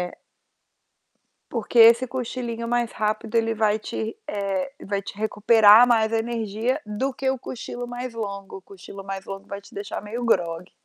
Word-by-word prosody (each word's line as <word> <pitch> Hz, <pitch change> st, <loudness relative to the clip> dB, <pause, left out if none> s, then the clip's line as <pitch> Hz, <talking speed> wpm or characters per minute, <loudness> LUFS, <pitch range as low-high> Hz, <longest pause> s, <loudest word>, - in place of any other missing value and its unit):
Eh 180 Hz, 0 st, -4 dB, 1.4 s
porque 235 Hz, 0 st, 0 dB
esse 235 Hz, +3 st, +8 dB
cochilinho 240 Hz, -2 st, -4 dB
mais 240 Hz, -1 st, 0 dB
rápido, 215 Hz, +1 st, -2 dB
ele 225 Hz, 0 st, +2 dB
vai 215 Hz, -1 st, +2 dB
te 220 Hz, +1 st, -4 dB
eh, 200 Hz, +5 st, -2 dB
vai 200 Hz, 0 st, -1 dB
te 200 Hz, -, -9 dB
recuperar 215 Hz, +1 st, +6 dB
mais 225 Hz, -2 st, +3 dB
a 225 Hz, -, +3 dB
energia, 230 Hz, +3 st, -2 dB
do 215 Hz, +6 st, -2 dB
que 265 Hz, +1 st, -1 dB
o 265 Hz, -, 0 dB
cochilo 245 Hz, 0 st, -6 dB
mais 245 Hz, 0 st, -6 dB
longo. 200 Hz, -4 st, -6 dB
O -, -, -13 dB
cochilo 195 Hz, +1 st, -11 dB
mais 195 Hz, 0 st, -6 dB
longo 195 Hz, 0 st, -8 dB
vai 200 Hz, 0 st, -6 dB
te 200 Hz, -, -17 dB
deixar 200 Hz, 0 st, -5 dB
meio 220 Hz, +4 st, -5 dB
grogue. 175 Hz, -5 st, 0 dB
220 Hz, 170 wpm, -24 LUFS, 200-235 Hz, 1.4 s, esse